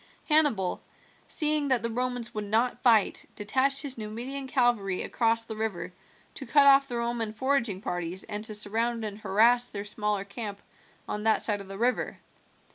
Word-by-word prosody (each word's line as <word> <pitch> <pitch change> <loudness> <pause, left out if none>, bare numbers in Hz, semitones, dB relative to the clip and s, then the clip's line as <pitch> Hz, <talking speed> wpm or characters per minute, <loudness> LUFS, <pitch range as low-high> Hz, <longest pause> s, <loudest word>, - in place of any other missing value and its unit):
Hannibal, 290 - +2 0.5
seeing 300 -1 +3
that 255 -4 +2
the 230 - 0
Romans 245 0 -1
would 210 -1 -4
not 225 +4 0
fight, 225 -5 +3
detached 265 +6 +1
his 270 -4 -5
Numidian 245 +6 -4
cavalry 240 -8 +1
across 230 -1 +1
the 225 -1 -7
river 185 -5 -4 0.4
to - - -8
cut 285 -2 +5
off 275 0 +6
the 240 - -4
Roman 235 -2 -2
foraging 235 -4 0
parties 175 -1 -4
and 210 0 -5
to 215 - -4
surround 225 +2 -1
and 210 0 -6
harass 230 +5 +3
their 205 -3 -6
smaller 210 -1 -2
camp 200 0 -6 0.5
on 210 - -3
that 220 0 +2
side 205 -2 -1
of 195 - -11
the 195 0 -8
river. 245 +3 0
225 Hz, 170 wpm, -28 LUFS, 205-250 Hz, 0.5 s, off